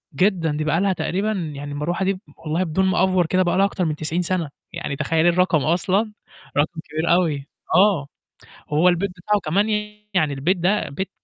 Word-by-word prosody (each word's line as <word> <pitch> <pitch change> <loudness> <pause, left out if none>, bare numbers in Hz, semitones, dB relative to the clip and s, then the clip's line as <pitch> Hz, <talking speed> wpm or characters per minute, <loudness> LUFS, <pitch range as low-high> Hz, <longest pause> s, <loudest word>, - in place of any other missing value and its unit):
جدًا، 180 -1 +2
دي 150 +1 -2
بقى 160 +3 +1
لها 195 -1 +2
تقريبًا 195 +4 -1 0.2
يعني 145 +1 -6
المروحة 170 +6 -2
دي 195 - +2
ب 185 - -10 0.2
والله 165 +2 -1
بدون 185 +2 0
ما 190 -1 +2
أأفور 185 -2 +3
كده 185 +3 +2
بقى 175 0 +1
لها 195 - +5
أكتر 195 -2 -1
من 155 -2 -1
90 160 +3 -1
سَنة، 175 -3 -1 0.2
يعني 170 -4 -4
تخيّلي 165 +4 +2
الرقم 175 -4 +2
أصلًا، 185 +6 +1 0.5
رقم 155 +3 +1
كبير 155 +2 -1
أوي 155 -6 +1 0.3
آه، 185 -6 +4 0.6
هو 155 +4 +4
البيت 180 +3 +1
بتاعه 200 +3 -1
كمان 195 +6 +1 0.5
يعني 155 -6 +2
البيت 155 +8 +1
ده 185 +4 +1
بيت 190 +8 -4
175 Hz, 190 wpm, -22 LUFS, 155-190 Hz, 0.6 s, لها